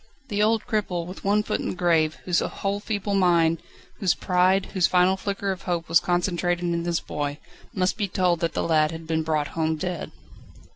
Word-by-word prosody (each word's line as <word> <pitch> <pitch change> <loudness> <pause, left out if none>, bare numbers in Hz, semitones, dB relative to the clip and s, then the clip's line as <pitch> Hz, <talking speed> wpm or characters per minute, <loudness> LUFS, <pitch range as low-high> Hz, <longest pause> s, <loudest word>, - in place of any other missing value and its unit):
The 205 -1 0
old 220 +1 +2
cripple, 200 -7 -1
with 185 +2 -9
one 205 +2 +2
foot - - -2
in - - -3
the - - -4
grave, 165 -3 +2
whose 175 -2 +2
whole 200 +1 -2
feeble 205 -1 -3
mind, 170 -4 +3 0.4
whose 190 -4 +2
pride, 185 +1 +2
whose 185 -4 +3
final 180 +1 +4
flicker 200 0 -2
of 190 0 -5
hope 170 -3 -2
was 165 -1 +5
concentrated 175 0 0
in 170 -1 -1
his 170 -1 0
boy, 145 -1 -4 0.3
must 185 0 0
be 205 -2 0
told 180 -2 +1
that 165 0 -1
the - - -1
lad 155 -2 +3
had 165 0 -7
been 160 0 0
brought 155 -2 -1
home 160 -1 -1
dead. 180 +2 -4
180 Hz, 200 wpm, -25 LUFS, 165-195 Hz, 0.4 s, was